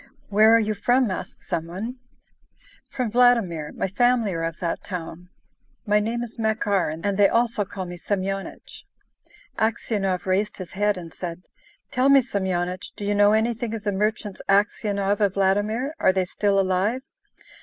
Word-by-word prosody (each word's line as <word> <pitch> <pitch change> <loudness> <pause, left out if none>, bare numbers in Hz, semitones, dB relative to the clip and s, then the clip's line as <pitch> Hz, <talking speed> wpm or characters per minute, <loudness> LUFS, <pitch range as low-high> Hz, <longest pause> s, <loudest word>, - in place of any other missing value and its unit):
"Where 215 +2 +6
are - - +5
you 215 -1 0
from?" 240 +3 +2
asked 185 - -6
some 165 0 -3
one. 215 +9 -5 0.9
"From 250 -4 -2
Vladimir. 220 -11 +3
My - - -2
family 235 0 +2
are 165 - -3
of 165 -1 -3
that 170 -2 -3
town. 175 -1 -7 0.6
My 210 -1 +3
name 230 +3 -2
is 235 0 -9
Makar, 215 -4 +1
and 160 +2 -6
they 205 -1 +5
also 230 -3 +1
call 190 -1 -6
me 175 0 -7
Semyonich." 195 +1 -4 0.8
Aksionov 205 -4 0
raised 195 +3 0
his 185 -3 -8
head 205 0 +1
and 170 -2 -9
said: 175 0 -6 0.5
"Tell 255 +2 +2
me, 275 -1 +7
Semyonich, 185 -5 -2
do 205 - -5
you 205 - +1
know 205 0 +5
anything 225 +1 0
of 215 - -7
the 205 - 0
merchants 210 0 -2
Aksionov 200 0 +1
of 200 -2 +2
Vladimir? 205 +8 +1
Are - - +4
they 190 -1 0
still 200 +2 +1
alive?" 195 +7 0
205 Hz, 165 wpm, -24 LUFS, 185-225 Hz, 0.9 s, me